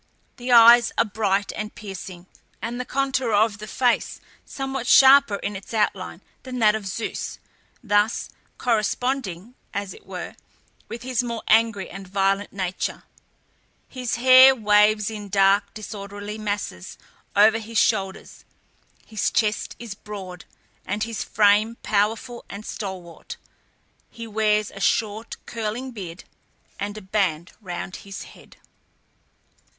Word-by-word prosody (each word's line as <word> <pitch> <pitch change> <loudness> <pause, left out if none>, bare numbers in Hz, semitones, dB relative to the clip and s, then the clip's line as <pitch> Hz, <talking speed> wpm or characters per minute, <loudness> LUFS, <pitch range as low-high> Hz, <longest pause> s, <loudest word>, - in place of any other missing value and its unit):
The 250 0 -4
eyes 235 0 +8
are - - +4
bright 205 -1 0
and 210 0 -5
piercing, 190 -3 -8 0.3
and 240 +2 -4
the - - -6
contour 265 -3 -1
of 205 0 +2
the 215 - -8
face 245 +1 0 0.2
somewhat 270 -2 -5
sharper 270 -5 +7
in 205 +1 -4
its 195 +4 -8
outline 215 - -1 0.2
than 255 -1 -7
that 215 -3 +4
of 215 -2 -4
Zeus, 205 +4 -4 0.5
thus 205 0 +1 0.3
corresponding, 235 -3 -1 0.2
as 200 -1 -3
it - - -17
were, - - -6 0.5
with 235 +1 -7
his 255 -1 0
more 235 -2 -5
angry 225 -3 +3
and 195 0 -9
violent 195 +1 0
nature. 185 -2 -3 0.8
His 250 -3 -3
hair 260 +2 +8
waves 210 -1 +3
in 210 -2 -7
dark, 195 +1 +3
disorderly 205 0 -7
masses 205 - -4 0.4
over 215 +2 +5
his 225 0 -6
shoulders; 190 -1 0 0.6
his 215 -3 -1
chest 210 -2 0
is 230 -3 -7
broad, 195 -4 -9 0.4
and 205 +3 -2
his 225 -2 -3
frame 215 +2 +3
powerful 225 +4 -1
and 205 +2 -8
stalwart; 185 -5 -7 0.7
he 230 -1 -9
wears 215 -1 +1
a 195 - -10
short, 215 +2 0
curling 230 +3 -4
beard, 185 -6 -8 0.6
and 205 +1 -4
a - - -7
band 185 -4 -1
round 185 -1 -6
his 195 -1 -8
head. - - -16
210 Hz, 130 wpm, -23 LUFS, 200-230 Hz, 0.8 s, eyes